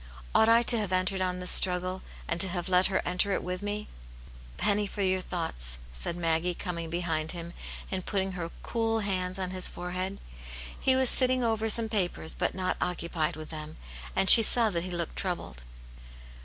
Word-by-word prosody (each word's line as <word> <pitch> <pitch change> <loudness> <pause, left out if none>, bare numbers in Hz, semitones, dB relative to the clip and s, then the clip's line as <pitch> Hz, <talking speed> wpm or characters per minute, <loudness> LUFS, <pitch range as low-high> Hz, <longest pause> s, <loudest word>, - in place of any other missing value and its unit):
Ought 220 - +4
I 230 +1 +5
to 235 -1 +2
have 205 -3 -3
entered 185 +1 -1
on 180 -1 -2
this 180 0 0
struggle, 185 0 +2 0.3
and 170 - -1
to 190 - +2
have 175 0 -4
let 185 0 +3
her 190 - -1
enter 180 +3 0
it - - -2
with 180 +1 -5
me 205 +1 -4
V - - -17 0.7
"A - - -11
penny 205 0 +2
for 200 0 -4
your 185 0 0
thoughts!" 65 - -1 0.2
said 65 - -5
Maggie, 170 +1 -1
Coming 170 -2 -5
behind 165 -2 -3
him, 170 0 -8 0.4
and 185 -1 -3
putting 195 -1 -2
her 175 -2 -5
cool 225 -1 -1
hands 185 -2 -3
on 185 -1 -4
his 185 -1 0
forehead. 185 +2 -5 0.6
He 260 - +2
was 260 0 +3
sitting 255 0 +1
over 225 -1 -1
some 225 +1 +2
papers, 185 -7 -2
but - - -2
not 185 -1 -2
occupied 170 -3 -2
with 155 0 -9
them, 155 -1 -8 0.4
and 195 - +1
she 230 - +14
saw 225 0 +5
that 170 -1 -3
he - - -6
looked 170 -2 -5
troubled. 175 - -4
185 Hz, 195 wpm, -28 LUFS, 175-205 Hz, 0.7 s, she